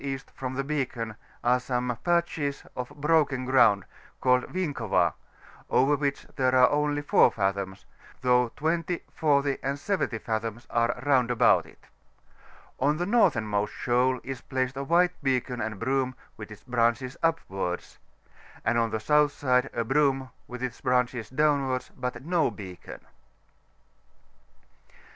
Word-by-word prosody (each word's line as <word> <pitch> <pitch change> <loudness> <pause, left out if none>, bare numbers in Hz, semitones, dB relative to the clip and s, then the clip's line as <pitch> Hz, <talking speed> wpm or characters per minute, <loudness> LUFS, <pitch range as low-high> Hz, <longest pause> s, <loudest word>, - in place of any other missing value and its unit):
E. 135 -1 -2 0.2
from 130 -1 -5
the 135 - -1
beacon 130 -6 -3 0.3
are 125 +1 +3
some 125 -1 -2
patches 170 -5 0
of 125 -1 -4
brokm 145 -3 +1
graimdt 120 -7 +4 0.4
called 125 -1 +3
Winkova, 120 - 0 0.6
over 140 +3 +3
which 140 -1 -2
are 130 -1 +5
only 145 0 0
4 - - +5
fathoms, 95 -1 -2 0.4
though 125 -1 +3
20, 165 +4 -1
40, 140 -3 +1
and 140 +1 -2
70 185 - -1
fathoms 110 +1 -4
are 115 +1 +1
round 130 -4 +3
about 120 -1 +4
it. - - -19 0.9
On 145 +3 +2
the 175 - -1
northernmost 115 - +2
shoal 125 +1 +1
is 130 0 -6
placed 130 0 -2
a 135 - -3
white 175 +5 +3
beacon 130 -3 -1
and 110 -2 -3
broom, 130 +1 0 0.2
with 105 0 -9
ks 105 -5 -12
branehes 120 +1 0
upwards; 95 - -2 0.7
and 115 +2 +2
on 115 -1 +1
the 110 0 -2
south 150 +4 +3
side 130 -2 +1
a 115 - -1
broom, 135 +1 +1 0.2
with 125 0 -7
its 125 -2 -4
branches 125 -3 0
downwi»rds, 140 -2 +1
but 125 +1 -5
no 170 -2 +2
beacon. 95 -4 -10
130 Hz, 135 wpm, -27 LUFS, 120-145 Hz, 0.9 s, are